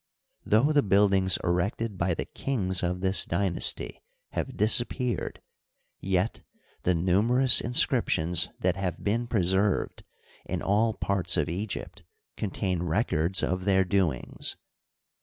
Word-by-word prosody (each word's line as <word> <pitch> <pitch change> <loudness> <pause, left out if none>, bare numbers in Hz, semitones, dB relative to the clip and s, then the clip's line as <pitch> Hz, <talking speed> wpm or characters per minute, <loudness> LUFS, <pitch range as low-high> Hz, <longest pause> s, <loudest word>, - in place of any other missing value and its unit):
Though 115 +8 +3
the 145 -1 +4
buildmgs 95 -3 +3
erected 100 +5 -1
by 85 -1 -1
the - - -4
kmgs 95 -9 -2
of 90 +1 -2
this 95 0 +2
dynasty 85 0 -2 0.3
have - - -4
disappeared, 120 +1 0 0.6
yet 95 +2 -1 0.4
the 90 - +1
numerous 110 +9 +3
inscnptions 90 -7 +2
that 90 0 +1
have 95 -3 -4
been 115 +4 -1
preserved 95 -2 0 0.4
in - - -4
all 110 +2 +1
parts 95 -3 0
of 80 -3 0
Egypt 95 +5 -5 0.3
contain 95 -4 -2
records 85 -1 0
of 90 0 -1
their 95 -1 +3
doings. 90 -8 -1
95 Hz, 120 wpm, -27 LUFS, 90-105 Hz, 0.6 s, the